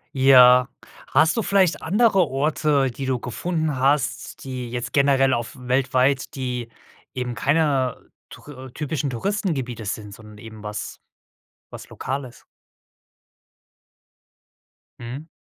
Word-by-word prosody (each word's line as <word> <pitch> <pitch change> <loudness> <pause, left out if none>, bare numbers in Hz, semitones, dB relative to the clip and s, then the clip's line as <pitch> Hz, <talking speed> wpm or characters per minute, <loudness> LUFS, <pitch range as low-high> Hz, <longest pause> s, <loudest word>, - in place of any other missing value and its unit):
Ja. 125 -1 +7 0.4
Hast 160 +7 +3
du - - +2
vielleicht 190 -4 +2
andere 195 -1 +3
Orte, 140 -1 +1
die 135 +2 -6
du 130 -1 0
gefunden 155 +4 -2
hast, 135 -2 0
die 125 -3 -6
jetzt 120 0 -4
generell 135 -2 +3
auf 120 -1 -3
weltweit, 130 +2 0
die 125 -3 -4 0.4
eben 125 -1 -3
keiner 140 -2 +1 0.3
Tour 130 -3 -12
typischen 150 -2 -3
Touristengebiete 130 - -3
sind, 105 0 -5
sondern 105 0 -14
eben 110 0 -12
was 105 0 -6 0.7
was - - -10
Lokales 130 -2 -6 2.6
Mhm. 130 +7 -8
130 Hz, 110 wpm, -23 LUFS, 125-150 Hz, 2.6 s, Ja